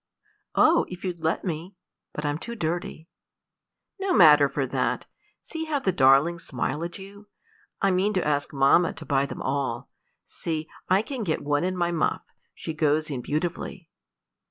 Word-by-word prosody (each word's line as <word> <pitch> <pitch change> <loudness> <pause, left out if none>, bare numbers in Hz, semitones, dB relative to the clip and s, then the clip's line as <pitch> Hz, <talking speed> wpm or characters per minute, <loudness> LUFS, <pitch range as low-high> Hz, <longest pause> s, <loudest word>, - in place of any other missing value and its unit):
"Oh, 330 +2 +4
if 180 0 -9
you'd 175 -3 -4
let 160 +4 0
me! 175 +2 -4 0.4
but 150 - -5
I'm 145 +1 -1
too 235 +5 -6
dirty." 170 -3 -3 0.9
"No 385 -1 0
matter 150 -5 +7
for 140 0 -1
that. 125 -2 -1 0.4
See 320 0 -5
how 310 -2 0
the 230 -9 0
darlings 150 +3 +4
smile 135 +3 -3
at 170 0 -5
you. 200 +2 -12 0.6
I 195 - +4
mean 185 +3 +2
to 185 - 0
ask 145 -1 0
mamma 140 +5 +4
to 160 - -10
buy 140 0 +1
them - - -7
all. 130 -3 -2 0.3
See, 160 -1 -4 0.2
I 190 +3 +4
can 255 -2 -4
get 165 -6 -1
one 145 +1 +1
in 185 0 -1
my 175 -1 +1
muff: 165 -2 0 0.3
she 160 - -5
goes 155 0 +1
in 130 -3 -3
beautifully." 165 +4 -4
165 Hz, 170 wpm, -26 LUFS, 145-185 Hz, 0.9 s, matter